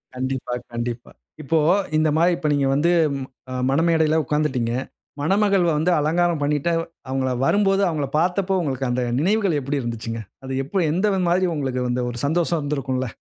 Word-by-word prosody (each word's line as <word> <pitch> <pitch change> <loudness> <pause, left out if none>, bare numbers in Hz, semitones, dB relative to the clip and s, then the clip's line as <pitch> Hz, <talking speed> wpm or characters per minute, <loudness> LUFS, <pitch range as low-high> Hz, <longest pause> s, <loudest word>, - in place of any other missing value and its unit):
கண்டிப்பா, 130 -1 -3 0.2
கண்டிப்பா. 120 0 -4 0.3
இப்போ 160 +4 +1 0.4
இந்தமாரி 160 +3 +3
இப்ப 160 -4 -2
நீங்க 140 -1 +1
வந்து 165 +5 +2 0.3
ம 130 -1 -8
மணமேடையில 160 +1 +3
உட்காந்துடீங்க. 130 -6 0 0.5
மணமகள் 195 +2 +2
வந்து 160 +4 +2
அலங்காரம் 165 +1 +1
பண்ணிட்டு 150 +3 0 0.4
அவுங்கள 130 -1 0
வரும்போது 195 +4 +3
அவுங்களப் 150 -4 -2
பார்த்தப்போ, 185 +2 +1
உங்களுக்கு 135 -4 -2
அந்த 125 +1 0 0.2
நினைவுகள் 195 -2 +2
எப்பிடி 140 +1 -2
இருந்துச்சுங்க? 115 -1 -4 0.2
அது 135 - -4
எப்போ 185 +8 -2
எந்த 195 +3 +1
மாதிரி 185 +1 +2
உங்களுக்கு 130 -3 -2
வந்து 125 +1 0
ஒரு 120 -1 -6
சந்தோஷம் 170 +2 +1
இருந்திருக்கும்ல. 130 -3 -2
150 Hz, 145 wpm, -22 LUFS, 130-175 Hz, 0.5 s, இந்தமாரி